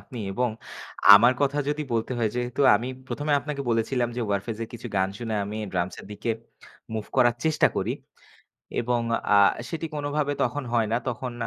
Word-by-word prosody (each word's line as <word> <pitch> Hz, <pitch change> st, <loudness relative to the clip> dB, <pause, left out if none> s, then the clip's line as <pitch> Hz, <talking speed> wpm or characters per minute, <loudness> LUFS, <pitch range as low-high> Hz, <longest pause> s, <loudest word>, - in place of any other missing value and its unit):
আপনি 125 Hz, -4 st, -10 dB
এবং 125 Hz, +5 st, +1 dB, 0.7 s
আমার 120 Hz, +5 st, +7 dB
কথা 140 Hz, 0 st, +1 dB
যদি 150 Hz, +1 st, -1 dB
বলতে 115 Hz, +2 st, -1 dB
হয় 110 Hz, -2 st, +1 dB
যেহেতু 125 Hz, +2 st, -2 dB, 0.2 s
আমি 120 Hz, +5 st, -4 dB, 0.2 s
১ম 145 Hz, -, -4 dB
এ -, -, +4 dB
আপনাকে 145 Hz, -1 st, -4 dB
বলেছিলাম 120 Hz, +2 st, +1 dB, 0.2 s
'Warfaze' 100 Hz, +3 st, -2 dB
যে 115 Hz, -, -1 dB
এর -, -, -13 dB
কিছু 120 Hz, -, -7 dB
গান 95 Hz, 0 st, +2 dB
শুনে 115 Hz, -2 st, -3 dB
আমি 105 Hz, +2 st, -5 dB, 0.2 s
drums 90 Hz, 0 st, -1 dB
এর -, -, -13 dB
দিকে 110 Hz, +3 st, -3 dB, 0.6 s
move 110 Hz, -1 st, -4 dB
করার 120 Hz, -2 st, +5 dB
চেষ্টা 155 Hz, -1 st, +4 dB
করি। -, -, 0 dB, 0.9 s
এবং 120 Hz, 0 st, 0 dB, 0.3 s
আ -, -, +7 dB, 0.3 s
সেটি 165 Hz, -1 st, -4 dB
কোনভাবে 145 Hz, 0 st, -1 dB
তখন 130 Hz, +4 st, -1 dB
হয় 115 Hz, -2 st, +2 dB
না। -, -, +3 dB
তখন 125 Hz, +1 st, -4 dB
120 Hz, 185 wpm, -26 LUFS, 110-140 Hz, 0.9 s, আমার